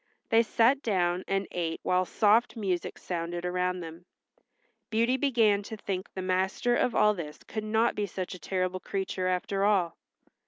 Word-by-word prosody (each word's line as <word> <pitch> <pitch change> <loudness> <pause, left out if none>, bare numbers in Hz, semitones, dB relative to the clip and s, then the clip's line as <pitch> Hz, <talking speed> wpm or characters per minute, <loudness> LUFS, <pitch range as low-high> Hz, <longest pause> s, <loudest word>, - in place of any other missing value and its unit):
They 225 0 +6
sat 235 +4 +3
down 180 -5 0
and 195 0 0
ate 165 -2 -2
while 185 0 +2
soft 220 +6 +3
music 190 -6 -2
sounded 175 0 -4
around 180 0 -1
them. 165 +1 -9 0.8
Beauty 230 +2 +2
began 230 -7 +3
to 220 +2 -8
think 190 -2 -4
the 190 - -3
master 190 +6 +1
of 240 -1 +1
all 210 0 +5
this 155 -6 -7
could 215 -1 -4
not 220 +2 +2
be 205 -1 -2
such 185 0 -5
a 180 - -9
terrible 185 0 -2
creature 190 -1 -3
after 195 +2 0
all. 195 -5 +2
190 Hz, 165 wpm, -29 LUFS, 180-220 Hz, 0.8 s, They